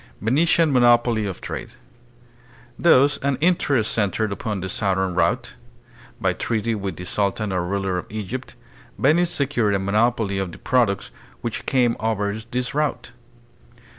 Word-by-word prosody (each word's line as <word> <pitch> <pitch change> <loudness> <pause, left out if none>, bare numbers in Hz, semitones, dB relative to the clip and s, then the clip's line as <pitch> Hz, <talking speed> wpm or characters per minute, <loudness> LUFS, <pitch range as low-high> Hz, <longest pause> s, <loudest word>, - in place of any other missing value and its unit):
Venetian 155 - +2
Monopoly 120 -3 +4
of 95 - -6
Trade. - - -6 1.1
Thus 145 -4 +5
all 140 -1 0
interest 140 -9 +2
centered 110 0 0
upon 105 0 -3
the 95 - -3
southern 95 -1 -1
route. 90 - 0 0.7
By - - +1
treaty 115 0 -1
with 100 -4 -4
the 90 - -8
sultan 100 +2 -1
or 90 -2 0
ruler 95 0 -1
of - - -9
Egypt, 110 +5 -6 0.4
Venice 170 +5 +3
secured 120 -10 0
a - - +1
monopoly 105 0 +1
of 95 -3 -3
the - - -10
products 115 -6 +1 0.3
which - - -4
came 125 -3 +2
over 105 -2 -1
this 120 +4 -4
route. 150 -5 -1
110 Hz, 140 wpm, -22 LUFS, 100-130 Hz, 1.1 s, Thus